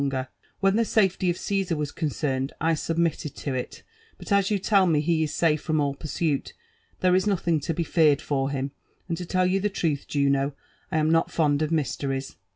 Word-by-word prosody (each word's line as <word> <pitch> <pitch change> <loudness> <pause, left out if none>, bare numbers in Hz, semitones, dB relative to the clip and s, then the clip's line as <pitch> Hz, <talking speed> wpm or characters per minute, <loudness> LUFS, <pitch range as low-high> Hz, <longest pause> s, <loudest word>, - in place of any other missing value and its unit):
longer/ 130 -2 -2 0.3
When 195 +1 +3
the - - +3
salety 190 -4 +2
of 175 - 0
Cesar 195 -4 -1
was 150 -1 -3
concerned, 140 -4 -2
I 165 +1 +2
submitted 165 -2 -1
Co 140 - -4
it; 125 -1 -5 0.3
but - - -10
as 200 -1 +4
yoq 200 -3 -1
tell 195 -3 +4
me 160 -3 +3
he 160 +1 +1
is 155 - 0
safe 155 -3 +2
from 155 -2 0
all 140 -1 +1
pursuit, 150 0 -2 0.5
there 185 -1 +4
is 185 +3 +2
nothing 175 -5 +1
to 155 +3 -2
be 170 - 0
feared 155 -4 +3
for 135 -3 -1
him: 135 0 -3 0.4
and 170 - -1
to 175 +1 -6
tell 185 0 +2
you 190 +2 +1
(ho 210 - +2
truth, 165 -8 -2
Juno, 140 0 +1 0.4
I - - +1
arti 155 0 +2
not 165 0 +3
fond 150 -3 +1
of 155 0 0
mysteries." 135 -3 -2
160 Hz, 210 wpm, -25 LUFS, 140-180 Hz, 0.5 s, as